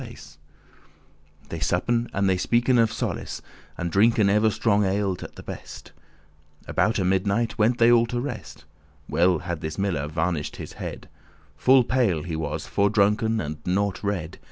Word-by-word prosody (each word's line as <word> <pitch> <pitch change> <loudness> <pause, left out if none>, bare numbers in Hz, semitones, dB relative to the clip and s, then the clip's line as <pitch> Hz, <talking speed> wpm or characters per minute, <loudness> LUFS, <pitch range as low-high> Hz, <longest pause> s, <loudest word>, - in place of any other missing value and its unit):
*roomier - - -8
lodging* - - -21
They 85 - -5
suppen, 115 +9 0
and 100 0 0
they 95 - +3
speaken 120 +6 +2
of 115 -1 +2
solace, - - -4 0.4
And 85 -1 -3
drinken 105 +1 +4
ever 105 +2 +3
strong 105 0 +1
ale 100 0 0
at - - -9
the - - -10
best. - - -9 0.8
Aboute 105 -3 +1
midnight 100 +5 0
went 115 +3 +3
they 115 0 +5
all 120 0 +4
to 120 +1 -2
rest. 110 - -7 0.4
Well 90 +1 +3
had 85 0 -5
this 80 0 -5
miller 90 -8 -1
varnished 80 0 -2
his - - -8
head; - - -7 0.5
Full 130 - +5
pale 115 -11 +1
he 80 -1 -4
was, 80 -2 -3
fordrunken, 105 +2 +2
and 75 -3 -4
*nought 100 +2 -1
red*. 95 -6 -3
100 Hz, 160 wpm, -24 LUFS, 85-115 Hz, 0.8 s, they